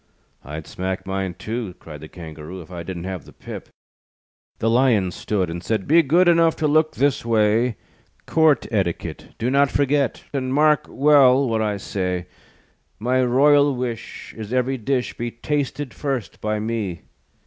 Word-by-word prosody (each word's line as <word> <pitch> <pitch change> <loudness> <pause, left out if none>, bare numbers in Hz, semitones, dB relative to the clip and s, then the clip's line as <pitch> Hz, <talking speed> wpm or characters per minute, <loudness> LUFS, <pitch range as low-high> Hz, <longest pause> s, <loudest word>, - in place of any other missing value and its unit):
"I'd 75 +2 -7
smack 95 +1 -4
mine, 95 -2 -3
too," 110 -4 -5
Cried 75 -3 -11
the 80 - -8
Kangaroo, 80 +1 -9
"If 90 0 -12
I 85 -1 -6
didn't 85 0 -6
have 95 -2 -5
the - - -14
pip." - - -9 0.9
The 115 - -1
Lion 115 -6 +3
stood, 95 0 -1
And 85 +1 -6
said: 110 -4 -1
"Be 165 +3 +6
good 170 +5 +3
Enough 165 -1 +4
to 155 - 0
look 155 +1 +2
this 140 0 +1
way; 115 +1 +2 0.5
Court 160 -3 +3
Etiquette 95 -6 -3
Do 120 +3 -1
not 140 0 +4
forget, 140 -2 +1
And 130 -1 -1
mark 150 -1 +3
well 140 -2 +5
what 115 -2 0
I 105 -2 0
say: 90 -2 -3 0.7
My 125 +4 +1
royal 140 +3 +4
wish 120 -2 -5
Is 110 -1 -7
ev'ry 130 +1 0
dish 125 +2 -1
Be 120 0 -3
tasted 145 +3 -3
first 135 -6 -4
by 105 0 -1
me." 105 -5 -3
115 Hz, 160 wpm, -22 LUFS, 95-140 Hz, 0.9 s, Be